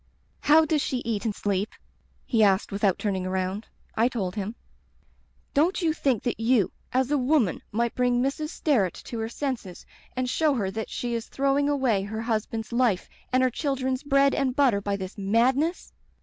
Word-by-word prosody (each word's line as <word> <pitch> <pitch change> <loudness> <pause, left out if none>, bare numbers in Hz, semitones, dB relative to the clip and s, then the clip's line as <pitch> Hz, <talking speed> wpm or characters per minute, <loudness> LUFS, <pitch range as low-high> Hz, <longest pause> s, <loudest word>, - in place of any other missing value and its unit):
*How 315 +2 +5
does 305 -1 +1
she 260 - -1
eat 225 -1 -2
and 215 -3 -1
sleep?' 200 +1 -1 0.5
he 230 -3 +2
asked, 195 0 +3
without 200 -2 +1
turning 195 -3 -1
around. 190 +3 -2 0.3
I 230 +2 +3
told 195 -8 -3
him. 210 +2 -4 0.3
" - - -38
* - - -39
Don't 320 +6 +2
you 320 -2 +2
think 265 -7 0
that 240 - -2
you, 225 -4 +2 0.2
as 260 +2 +1
a 295 - +3
woman, 255 - +2
might 235 +2 0
bring 245 -1 +2
Mrs. 275 +4 -1
Sterret 240 - +1
to 230 - -6
her 225 0 -2
senses 235 -8 -4 0.3
and 255 0 -1
show 295 +3 +2
her 195 -6 -1
that 220 +2 -4
she 240 -1 -3
is 230 -1 -3
throwing 275 +1 +1
away 260 -8 +2
her 220 +3 -4
hus 225 -2 0
band's 225 0 -5
life 235 -6 +1 0.2
and 255 0 +3
her 255 - +3
children's 265 -1 -1
bread 275 -1 +3
and 260 -2 0
butter 260 -8 +3
by 200 0 -1
this 190 +1 -7
madness? 255 - +1
240 Hz, 190 wpm, -26 LUFS, 205-275 Hz, 0.5 s, How